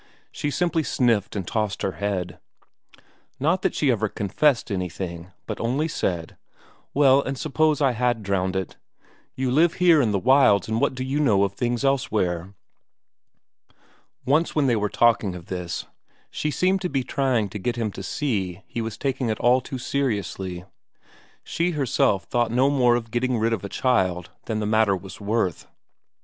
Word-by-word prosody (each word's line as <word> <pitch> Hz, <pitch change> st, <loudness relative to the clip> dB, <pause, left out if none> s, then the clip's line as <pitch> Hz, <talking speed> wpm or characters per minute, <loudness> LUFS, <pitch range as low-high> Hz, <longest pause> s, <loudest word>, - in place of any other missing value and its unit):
She 145 Hz, -, -3 dB
simply 170 Hz, +1 st, 0 dB
sniffed 115 Hz, -9 st, +1 dB
and 95 Hz, -4 st, -3 dB
tossed 105 Hz, -2 st, -2 dB
her 95 Hz, -, 0 dB
head. 95 Hz, -3 st, -3 dB, 1.0 s
Not 165 Hz, +7 st, +1 dB
that -, -, 0 dB
she 140 Hz, -3 st, +2 dB
ever 110 Hz, -2 st, 0 dB
confessed 120 Hz, +5 st, +1 dB
anything, 90 Hz, -1 st, -4 dB
but -, -, -5 dB
only 130 Hz, +7 st, 0 dB
said: 90 Hz, -, -3 dB, 0.5 s
"Well, 140 Hz, -1 st, +5 dB
and 135 Hz, 0 st, -4 dB
suppose 155 Hz, +1 st, +1 dB
I 135 Hz, -, +4 dB
had 120 Hz, -2 st, 0 dB
drowned 95 Hz, -1 st, -1 dB
it? 95 Hz, -1 st, -3 dB, 0.6 s
You 130 Hz, -1 st, -1 dB
live 165 Hz, +5 st, +4 dB
here 175 Hz, -4 st, +5 dB
in 120 Hz, -, +1 dB
the 100 Hz, -, +1 dB
wilds 120 Hz, -4 st, +4 dB
and 110 Hz, +1 st, -1 dB
what -, -, +1 dB
do 130 Hz, -, -3 dB
you 135 Hz, +3 st, -1 dB
know 105 Hz, -10 st, +3 dB
of 100 Hz, -1 st, -1 dB
things 120 Hz, +3 st, -1 dB
elsewhere?" 100 Hz, -9 st, 0 dB, 1.7 s
Once 155 Hz, +6 st, +2 dB
when 150 Hz, -2 st, +2 dB
they 125 Hz, -3 st, +3 dB
were 105 Hz, -1 st, 0 dB
talking 110 Hz, -4 st, +2 dB
of 85 Hz, -2 st, -9 dB
this, 90 Hz, -2 st, -4 dB, 0.5 s
she 150 Hz, -, -2 dB
seemed 185 Hz, +5 st, +1 dB
to 180 Hz, -, -2 dB
be 135 Hz, -2 st, -1 dB
trying 130 Hz, -5 st, 0 dB
to 105 Hz, -, -6 dB
get 120 Hz, +5 st, -2 dB
him 115 Hz, -3 st, -2 dB
to 95 Hz, -, -8 dB
see 95 Hz, -, -2 dB
he 115 Hz, -, -5 dB
was 110 Hz, -1 st, -5 dB
taking 130 Hz, -2 st, -1 dB
it 110 Hz, -, -2 dB
all 125 Hz, +2 st, +4 dB
too 130 Hz, -, -6 dB
seriously; 100 Hz, -9 st, -2 dB, 0.8 s
she 170 Hz, +1 st, -1 dB
herself 110 Hz, -7 st, +1 dB
thought 120 Hz, -1 st, 0 dB
no 130 Hz, +4 st, +3 dB
more 125 Hz, -4 st, +4 dB
of 115 Hz, -2 st, -4 dB
getting 125 Hz, +1 st, 0 dB
rid 115 Hz, +1 st, +1 dB
of 105 Hz, -, -3 dB
a 100 Hz, -, -5 dB
child 95 Hz, -10 st, 0 dB
than 110 Hz, -2 st, -2 dB
the 105 Hz, -, -2 dB
matter 110 Hz, -2 st, +3 dB
was 95 Hz, +3 st, -11 dB
worth. 100 Hz, -5 st, -1 dB
115 Hz, 175 wpm, -24 LUFS, 100-135 Hz, 1.7 s, Well